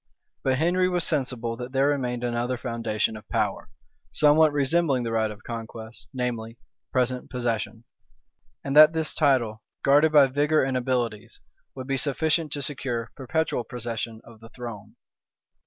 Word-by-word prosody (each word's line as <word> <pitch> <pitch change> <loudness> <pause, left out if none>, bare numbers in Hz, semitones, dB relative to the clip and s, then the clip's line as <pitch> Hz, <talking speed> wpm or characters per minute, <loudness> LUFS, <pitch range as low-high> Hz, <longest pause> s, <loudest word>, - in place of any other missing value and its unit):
But 130 -1 +1
Henry 180 +4 +2
was 180 -2 +1
sensible 125 -6 -1
that 125 +2 -7
there 135 +1 +3
remained 125 -4 -1
another 120 +1 -1
foundation 115 -3 -2
of 110 0 -12
power, 105 -4 -1 0.4
somewhat 155 +1 +5
resembling 145 -2 +1
the 115 - -3
right 110 -1 +1
of 105 +1 -10
conquest, 115 -1 -8
namely, 120 -3 -3 0.3
present 125 0 0
possession; 120 -2 -3 0.8
and 140 0 -3
that 155 +1 +9
this 160 -1 -1
title, 125 -8 +2 0.2
guarded 145 +3 +5
by 145 -2 +7
vigor 145 +3 +2
and 130 -1 -1
abilities, 120 -3 -2 0.4
would 130 -1 -6
be 135 0 -1
sufficient 155 +3 0
to 145 - -3
secure 120 -4 -3
perpetual 145 -1 -1
possession 115 -2 -5
of 115 -2 -15
the 115 +1 -13
throne. 110 -4 -9
125 Hz, 150 wpm, -25 LUFS, 115-145 Hz, 0.8 s, that